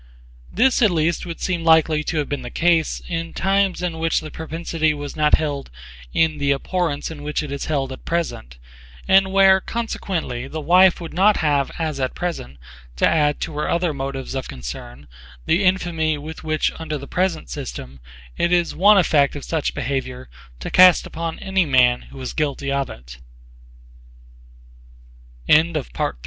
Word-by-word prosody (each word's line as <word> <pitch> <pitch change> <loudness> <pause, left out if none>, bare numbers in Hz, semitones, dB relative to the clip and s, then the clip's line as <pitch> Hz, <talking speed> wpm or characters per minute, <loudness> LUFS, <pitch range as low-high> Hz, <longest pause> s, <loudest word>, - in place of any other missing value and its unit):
This 255 +5 +2
at 215 - +6
least 170 0 0
would 170 - -6
seem 175 -3 -1
likely 160 -1 +4
to 165 - -2
have 150 - 0
been 145 - -3
the 120 - -7
case 165 +2 +1
in 165 -1 -4
times 195 -1 +1
in 170 -2 -3
which 165 0 +1
the 155 - -9
propensity 160 -1 -2
was 145 -1 -7
not 150 -1 +4
held 145 -3 -3 0.4
in 160 -2 +1
the 140 0 +1
abhorrence 165 +1 -2
in 150 -2 -9
which 150 +1 -2
it 145 - -7
is 140 - -4
held 135 -4 -1
at 130 - -9
present, 155 - -3 0.5
and 190 0 +4
where 190 -1 +5
consequently 185 - -4
the 155 +3 -6
wife 180 +4 +5
would 170 -2 -8
[not] 200 +5 +4
have 145 -3 +1
as 155 -4 -3
at 130 -1 -2
present 165 - -5 0.4
to - - +3
add 150 -2 +2
to 160 - -4
her - - -1
other 170 -2 0
motives 135 -1 -5
of 130 -1 -4
concern 60 +2 -8 0.4
the 175 +5 +2
infamy 170 -4 +1
with 155 +2 -9
which 155 -1 0
under 155 -2 -4
the 140 - -9
present 180 - -1
system 65 +2 -7 0.4
it 170 - +1
is 175 -1 +2
one 205 +4 +5
effect 150 -7 +3
of 145 - -6
such 160 -3 -2
behavior 130 -2 -4 0.3
to - - -6
cast 185 -1 +6
upon 165 0 -5
any 190 -1 0
man 125 -5 +3
who 135 - -12
is 130 - -5
gu 150 -3 -1
160 Hz, 165 wpm, -21 LUFS, 140-175 Hz, 0.5 s, at